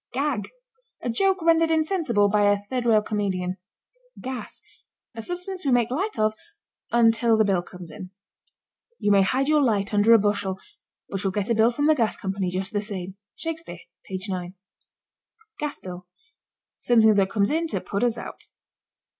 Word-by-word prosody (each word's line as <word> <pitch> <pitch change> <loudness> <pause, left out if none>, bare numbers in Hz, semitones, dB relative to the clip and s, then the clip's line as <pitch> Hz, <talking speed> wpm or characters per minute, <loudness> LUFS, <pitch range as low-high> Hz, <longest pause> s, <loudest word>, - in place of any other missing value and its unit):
GAG. 270 -7 -1 0.5
A 240 - -1
joke 380 +8 +1
rendered 330 0 +4
insensible 315 - +2
by 205 0 +3
a 205 - +3
third 240 +4 -4
rail 215 -2 +4
comedian. 190 -4 -2 0.6
GAS. 260 -1 -7 0.5
A 225 - -6
substance 360 - -4
we 275 - +1
make 245 -1 +2
light 385 +11 -2
of 215 0 +2 0.6
until 230 -1 +4
the 220 - +4
bill 190 -3 +2
comes 180 -1 -11
in. 190 -3 -9 0.9
"You 205 - +1
may 200 -1 +6
hide 260 +8 +1
your 305 -1 +4
light 210 -5 +1
under 205 +2 +4
a - - +8
bushel, 205 -2 0 0.5
but 195 -1 -4
you'll 195 - +1
get 205 +3 -2
a - - +5
bill 225 +1 +4
from 290 +4 -1
the 310 - +6
gas 230 -7 0
company 190 -1 -2
just 190 +4 -3
the 205 - 0
same." 190 -3 -6 0.2
(Shakespeare, 325 0 -6 0.2
page 190 +1 -5
9.) 180 -1 -4 1.0
GAS 295 -1 -3
BILL. 180 -1 -9 0.7
Something 225 -3 +5
that 195 -2 +2
comes 200 -1 +1
in 330 +2 0
to - - -1
put 200 +3 -3
us 240 -1 +1
out. - - -8
220 Hz, 170 wpm, -24 LUFS, 195-265 Hz, 1.0 s, a